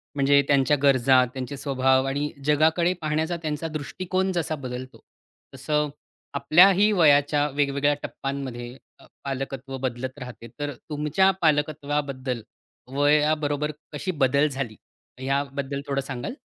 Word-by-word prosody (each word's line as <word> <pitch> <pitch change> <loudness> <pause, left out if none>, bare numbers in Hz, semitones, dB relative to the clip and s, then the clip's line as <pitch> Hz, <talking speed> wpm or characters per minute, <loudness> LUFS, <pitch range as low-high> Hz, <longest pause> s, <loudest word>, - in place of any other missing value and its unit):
म्हणजे 140 0 +4
त्यांच्या 140 +1 +3
गरजा, 130 -2 +5
त्यांचे 130 +1 -5
स्वभाव 130 -1 +2
आणि 145 +2 -2
जगाकडे 160 +4 +3
पाहण्याचा 160 +2 -1
त्यांचा 155 0 -3
दृष्टिकोन 185 +5 -2
जसा 170 -3 -1
बदलतो, 125 +1 -7 0.5
तसं 150 +3 0 0.5
आपल्याही 185 +9 +5
वयाच्या 145 -4 +4
वेगवेगळ्या 145 0 +2
टप्प्यांमध्ये 130 -3 -5 0.2
अ, - - -17 0.2
पालकत्व 135 -1 -5
बदलत 130 +1 -4
राहते. 125 -2 -9
तर 145 -1 -3 0.2
तुमच्या 150 +6 +2
पालकत्वाबद्दल 145 -5 0 0.5
वयाबरोबर 150 0 +2 0.2
कशी 185 +6 -3
बदल 140 +3 +3
झाली 135 -6 -4 0.5
याबद्दल 140 0 -2
थोडं 140 -1 0
सांगाल? 135 - -5
145 Hz, 115 wpm, -25 LUFS, 135-150 Hz, 0.5 s, गरजा